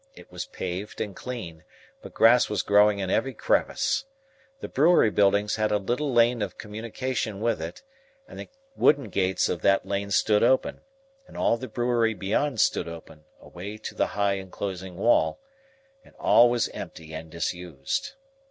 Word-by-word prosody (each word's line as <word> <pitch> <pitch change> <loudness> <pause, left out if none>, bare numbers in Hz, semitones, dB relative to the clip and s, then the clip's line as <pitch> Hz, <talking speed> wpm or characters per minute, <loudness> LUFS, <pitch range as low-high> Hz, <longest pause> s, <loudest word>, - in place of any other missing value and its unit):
It - - -15
was - - -6
paved 100 - -6
and 100 -3 -4
clean, 90 -11 -7 0.4
but - - -12
grass 120 +2 +5
was 105 -4 -1
growing 105 0 +4
in 95 -1 -3
every 135 -3 0
crevice. 265 - 0 0.5
The - - -6
brewery 150 -6 +4
buildings 100 +1 +2
had 110 0 0
a 105 - +3
little 125 +8 -2
lane 120 -1 +3
of 100 -3 -4
communication 110 0 -4
with 115 -5 0
it, 85 +2 -7 0.4
and - - -11
the - - -8 0.3
wooden 140 -2 +3
gates 95 -1 +1
of 85 - -3
that 100 0 +3
lane 100 0 -3
stood 105 +1 +3
open, 130 +3 +2 0.5
and - - -13
all - - +2
the 130 +2 -7
brewery 120 -3 0
beyond 110 +7 -1
stood - - +2
open, 80 -2 -11
away 100 +5 -9
to 110 - -7
the - - 0
high 100 -1 +1
enclosing 95 -1 -6
wall; 120 - +2 0.6
and - - -21
all 120 +1 +5
was 120 -1 +1
empty 80 -1 -9
and 80 +1 -7
disused. 85 - -4
105 Hz, 165 wpm, -26 LUFS, 95-120 Hz, 0.6 s, grass